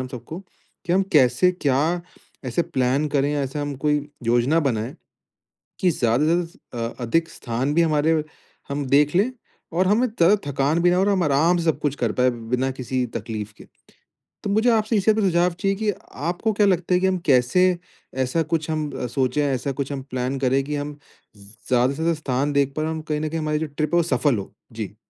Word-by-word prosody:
हम 130 - -6
सबको 160 +8 -8 0.5
कि 175 - +1
हम 195 +1 +4
कैसे 135 +4 +5 0.2
क्या 155 +6 +2 0.4
ऐसे 130 +7 0
प्लान 130 +2 0
करे 145 0 +1
ऐसा 140 +1 -2
हम 145 -1 -3
कोई 150 +2 +1 0.3
योजना 120 +7 +3
बनाए 115 +4 -3 0.9
कि 185 - +3
ज़्यादा 120 +1 +1
से 165 +2 +3
ज़्यादा 125 - -7
अ, - - -24
अधिक 165 +8 +1
स्थान 125 +5 -3
भी 170 - +4
हमारे 155 0 +2 0.5
हम 140 0 -2
देख 145 +4 +3
लें 215 +7 +3 0.4
और 185 +2 +2
हमें 230 +5 +3
थ 185 +5 +6
थकान 140 +4 +1
भी 175 - +5
ना - - +3
हो - - +3
और 205 - +2
हम 190 -3 +2
आराम 155 +5 +3
से 170 - -2
सब 160 - +1
कुछ 145 -1 -1
कर 120 -5 -1
पाएँ 125 0 +3
बिना 125 +3 -2
किसी 130 -1 -2
तकलीफ़ 105 -2 -6
के। - - -13 0.8
तो 200 - -1
मुझे 220 +4 +3
आपसे 220 0 +2
इसी 210 +2 +4
बात - - -3
पे 195 - +3
सुझाव 175 +1 +3
चाहिए 195 -1 +1
कि 215 0 0 0.4
आपको 200 +5 0
क्या 205 0 +3
लगता 180 -1 +1
है 180 - +3
कि 190 - +2
हम 185 -1 +1
कैसे 135 +7 +4 0.6
ऐसा 145 +6 0
कुछ 160 0 -1
हम 155 -2 -2 0.2
सोचे 135 +2 +1
ऐसा 135 0 -1
कुछ 140 +1 -3
हम 135 -1 -4
प्लान 130 +2 -2
करें 135 +1 +2
कि 150 +1 -3
हम 145 +1 -4 0.4
ज़ 100 -1 -16 0.2
ज़्यादा 125 0 +3
से - - -6
ज़्यादा 165 +1 +2
स्थान 140 +1 -1
देख 140 -1 +1
पाए 155 - -1
हम 160 0 -3
कहीं 150 0 0
न 155 - -1
कहीं 165 0 -2
हमारी 150 0 0
जो 160 - -1
ट्रिप 150 +3 -2
है - - +5
वो - - +4
सफल 135 -5 +1
हो। 95 - -7 0.2
जी। - - -6
150 Hz, 220 wpm, -23 LUFS, 130-170 Hz, 0.9 s, थ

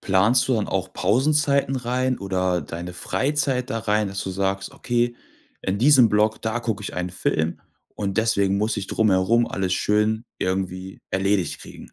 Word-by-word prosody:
Planst 105 +8 +3
du 130 - +3
dann 110 -3 0
auch 95 -1 -2
Pausenzeiten 140 +2 +2
rein 125 +1 -1
oder 95 -2 0
deine 85 +3 -7
Freizeit 130 +6 -1
da 115 - -1
rein, 105 -1 0
dass 100 0 -4
du 95 - -4
sagst: 95 +1 -2
„Okay, 120 0 -1 0.5
in 95 +2 -2
diesem 130 -1 +6
Block, 105 +1 +1
da 110 +1 -1
guck 110 -3 -2
ich - - -6
einen 90 0 -3
Film 80 -2 -1 0.3
und 100 -2 -3
deswegen 100 -3 +2
muss 105 +2 0
ich 95 -2 -3
drumherum 110 +3 +2
alles 95 -1 -2
schön 105 +4 +1 0.2
irgendwie 95 0 -3
erledigt 95 0 0
kriegen“? - - -12
105 Hz, 165 wpm, -23 LUFS, 95-120 Hz, 0.5 s, diesem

